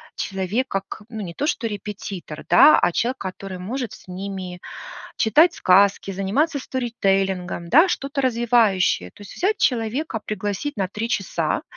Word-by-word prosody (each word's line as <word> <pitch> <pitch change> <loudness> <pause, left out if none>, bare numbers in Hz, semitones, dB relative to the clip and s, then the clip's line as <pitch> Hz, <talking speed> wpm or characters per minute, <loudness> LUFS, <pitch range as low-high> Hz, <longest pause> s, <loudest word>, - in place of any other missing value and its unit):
человек, 195 +7 -2
как, 195 0 -4
ну, 220 -2 -6
не 175 -4 -6
то 290 - -2
что 245 - -1
репетитор, 200 -6 -7
да, 300 - +8
а - - +2
человек, 245 +8 -1
который 190 -1 -6
может 235 +5 -4
с - - -15
ними 185 -1 -6 0.6
читать 310 +10 +4
сказки, 195 - +3
заниматься 240 - 0
сторителлингом, 195 -9 -1
да, 320 - +6
что-то 280 -4 -3
развивающее. 230 - +2
То - - -18
есть 205 - -11
взять 405 +4 +1
человека, 235 +2 0
пригласить 210 +7 -3
на 190 -2 -1
3 215 +3 -3
часа. - - -1
210 Hz, 150 wpm, -22 LUFS, 190-255 Hz, 0.6 s, да